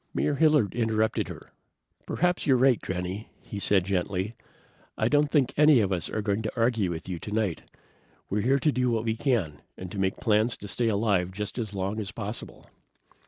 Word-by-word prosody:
Mayor 150 - +1
Hilliard 150 - +3
interrupted 110 -2 0
her. - - -10 0.6
"Perhaps 180 +1 0
you're 130 -2 +5
right, 130 -2 +4
Granny," 95 +3 -4
he 105 - -6
said 95 -2 +3
gently. 95 +2 -1 0.6
"I 110 - +2
don't 145 +3 +3
think 145 -5 +2
any 150 -3 +6
of 100 -3 +1
us 90 -4 -1
are 110 - -3
going 100 +1 0
to 110 - -3
argue 115 -5 +2
with 80 -1 -5
you 90 -3 -4
tonight. 105 -4 -2 0.7
We're 105 +2 -1
here 130 +6 +3
to 150 - +3
do 125 -2 +1
what 115 -2 0
we 110 -1 0
can, 110 - -1 0.2
and 90 -1 -7
to 100 - -5
make 95 0 0
plans 110 0 +2
to 100 - -9
stay 120 +4 0
alive 100 -4 +1
just 105 +5 -5
as 105 -3 -4
long 100 +3 -2
as 100 -3 -4
possible." 110 0 -7
110 Hz, 195 wpm, -27 LUFS, 95-120 Hz, 0.7 s, any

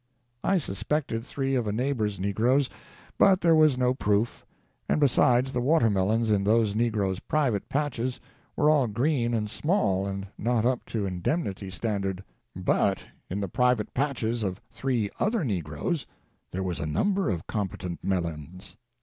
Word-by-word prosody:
I 195 - +3
suspected 130 - -2
three 135 +1 -2
of 120 -4 0
a - - 0
neighbor's 110 -4 -1
negroes, 120 +8 +2 0.5
but 195 -2 +5
there 170 -1 +5
was 155 -4 +5
no 125 0 +2
proof: 105 -2 0 0.5
and, - - +2
besides, 130 -2 +3
the 125 - 0
watermelons 115 -5 +2
in 100 -2 +2
those 110 0 +3
negroes' 105 -4 0
private 135 -10 0
patches 130 -4 -1 0.4
were 150 - +2
all 140 -5 +3
green 120 +1 +1
and 105 -1 -1
small, 105 - 0
and 95 0 -4
not 115 0 +1
up 125 0 +1
to 110 -3 -2
indemnity 95 - -2
standard. 100 -2 -2 0.3
But - - +1 0.2
in 95 - -2
the 100 - -1
private 125 +2 +1
patches 120 -4 -1
of 95 -2 -2
three 120 -6 -1
other 220 -3 +1
negroes 95 - -2 0.4
there 95 +1 -3
was 90 -2 -3
a 75 - -2
number 190 - +1
of 85 -5 -2
competent 95 -4 -4
melons. 85 -1 -4
115 Hz, 150 wpm, -27 LUFS, 100-135 Hz, 0.5 s, but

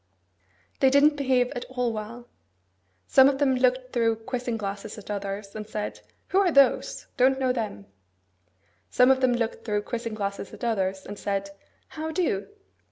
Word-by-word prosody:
They 265 - +5
didn't 285 +2 +5
behave 260 -3 +1
at 245 - -5
all 250 -2 -2
well. 225 +3 -7 0.8
Some 265 - +6
of 275 - -1
them 275 -2 +2
looked 255 0 +1
through 230 -2 +2
quizzing 245 -2 -2
glasses 200 0 -5
at 210 0 -8
others, 200 0 -5
and 215 0 -7
said, 210 -1 -4 0.3
'Who 380 - +3
are 380 -3 +3
those? 275 -3 +3
Don't 265 +1 +4
know 260 -1 +1
them.' 215 - -4 1.0
Some 250 +1 +5
of 265 0 +2
them 255 -1 +3
looked 230 -2 -2
through 210 -2 -1
quizzing 230 -1 -4
glasses 200 -1 -4
at - - -14
others, 195 -4 -1
and 205 0 -8
said, 195 0 -2 0.4
'How 315 0 -5
do? 320 - -1
240 Hz, 165 wpm, -26 LUFS, 210-260 Hz, 1.0 s, Some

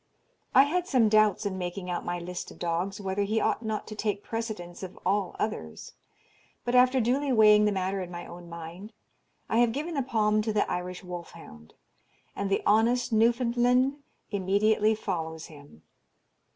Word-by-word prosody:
I 265 - +9
had 350 +5 -1
some 245 -9 +3
doubts 215 -1 +3
in 190 -2 -2
making 180 +1 -5
out 175 - -3
my 175 0 -3
list 175 +1 -6
of - - -13
dogs, 175 +4 -2
whether 195 0 -2
he 215 +2 +1
ought 235 - 0
not 220 -1 -3
to - - -8
take 210 -1 -2
precedence 215 -7 -5
of 185 -1 -8
all 195 -1 0
others; 80 - -4 0.7
but, 240 - -1
after 255 +1 +5
duly 265 +4 +1
weighing 210 -2 +6
the 210 - +2
matter 190 0 -1
in 180 - -6
my 175 0 -7
own 175 0 -11
mind, 170 +6 -9 0.5
I 225 - +1
have 240 -1 +4
given 305 +6 -3
the 280 - 0
palm 215 -4 +1
to 220 +1 -1
the 210 -1 +1
Irish 180 +1 -4
wolf 175 -1 -8
hound, 75 - -14 0.6
and 200 0 -2
the 195 - 0
honest 230 +3 +3
Newfoundland 245 +3 +3 0.3
immediately 210 +2 +2
follows 160 -6 -4
him. 145 - -15
210 Hz, 175 wpm, -28 LUFS, 180-230 Hz, 0.7 s, I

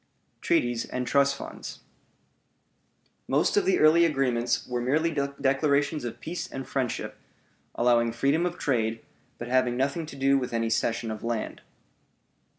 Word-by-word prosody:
TREATIES 120 -1 +1
AND 125 0 -4
TRUST 140 +1 +3
FUNDS - - -8 1.5
Most - - +2
of 410 -2 +3
the 375 -1 +3
early 165 +2 +6
agreements 130 -6 +1
were 125 -1 -2
merely 155 +7 +1
declarations 140 +1 0
of 120 - -6
peace 175 +2 -5
and 135 0 -6
friendship, 130 -3 -3 0.6
allowing 120 -1 +3
freedom 140 +9 +1
of 175 0 -6
trade, 115 -4 -1 0.4
but 120 - -6
having 125 -1 +1
nothing 140 +5 -1
to 155 - -9
do 135 0 +3
with 125 -2 -5
any 115 0 0
cession 115 0 0
of 110 - -7
land. 115 -1 -3
135 Hz, 145 wpm, -27 LUFS, 120-145 Hz, 1.5 s, early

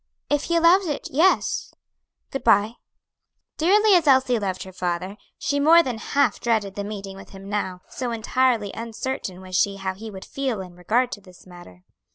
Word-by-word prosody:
"If 290 -1 +1
he 340 - 0
allows 340 +3 +5
it, 295 -2 -4
yes; 330 +8 +1 0.6
good 270 - -4
bye." 215 0 +4 0.8
Dearly 410 +6 +4
as 345 -4 +4
Elsie 260 -3 +4
loved 190 -3 -3
her 190 - -11
father, 180 +2 -3 0.2
she 285 0 -1
more 330 +4 +6
than 245 -6 -4
half 275 -2 +1
dreaded 220 -5 0
the 200 - -4
meeting 200 -2 -7
with 195 - -12
him 195 0 -11
now; 190 -3 -3
so 250 -2 -4
entirely 230 -2 +1
uncertain 225 -4 -5
was 185 -1 -7
she 200 +2 +2
how 190 -1 -3
he 220 +4 -9
would 190 -2 -9
feel 265 -6 -3
in 185 -2 -8
regard 230 +8 0
to 205 - -7
this 185 -2 -17
matter. 175 - -14
220 Hz, 185 wpm, -23 LUFS, 190-270 Hz, 0.8 s, more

